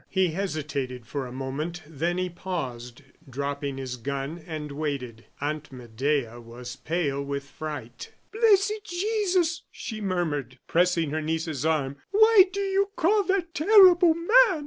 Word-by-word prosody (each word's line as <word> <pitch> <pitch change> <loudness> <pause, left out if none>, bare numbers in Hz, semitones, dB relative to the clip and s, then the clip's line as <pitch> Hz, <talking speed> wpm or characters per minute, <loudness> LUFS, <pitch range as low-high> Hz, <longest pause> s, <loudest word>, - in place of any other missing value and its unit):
He 190 -2 +2
hesitated 150 - -3
for 135 +2 -4
a - - -9
moment, 140 +7 -4
then 165 +3 -2
he 185 0 0
paused, 135 -9 -6 0.3
dropped 140 +2 -4
his 135 -2 -4
gun, 140 +6 -4
and 155 -3 -5
waited. 140 -6 -4
Aunt 150 +1 -3
Medea 125 0 -2
was 120 +1 -9
pale 145 -3 -2
with 140 0 -3
fright. 140 -5 -7 0.2
"Blessed 425 -2 +3
Jesus!" 365 -4 0
she 215 -2 -6
murmured, 155 - -2
pressing 170 -3 +2
her 155 +1 -1
niece's 160 -2 -2
arm; 140 -3 0
"why 435 -1 +7
do 400 +1 -3
you 395 0 +1
call 410 +6 +3
that 365 -3 0
terrible 360 -1 +7
man?" 335 +1 -7
155 Hz, 140 wpm, -26 LUFS, -, 0.3 s, why